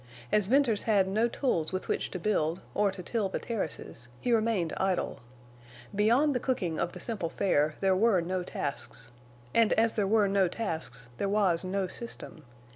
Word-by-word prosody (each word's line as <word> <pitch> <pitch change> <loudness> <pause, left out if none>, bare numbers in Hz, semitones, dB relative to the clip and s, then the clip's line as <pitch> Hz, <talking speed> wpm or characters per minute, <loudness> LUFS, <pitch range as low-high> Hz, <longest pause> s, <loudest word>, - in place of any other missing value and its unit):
As 210 -3 +3
Venters 245 -3 +3
had 200 -3 +4
no 215 +5 +2
tools 225 - -1
with 185 0 -3
which - - -1
to - - -5
build, 175 -3 0
or 205 0 +2
to 190 -1 -8
till 210 0 -1
the - - -2
terraces, 160 - -5
he 245 - -1
remained 220 -7 +1
idle. 190 -1 -1 0.7
Beyond 235 +9 +3
the 250 - 0
cooking 185 -12 -1
of 170 - -1
the - - -8
simple 200 -8 -3
fare 155 -5 +1
there 190 -1 +3
were 210 -1 +4
no 180 +2 -2
tasks. 140 -7 -5 0.4
And 230 -2 +4
as 225 0 +3
there 205 -3 0
were 210 0 +4
no 195 -1 +3
tasks, 160 - -3
there 200 - -1
was 195 -5 +2
no 190 +1 -1
system. 180 -6 -5
195 Hz, 180 wpm, -29 LUFS, 175-225 Hz, 0.7 s, had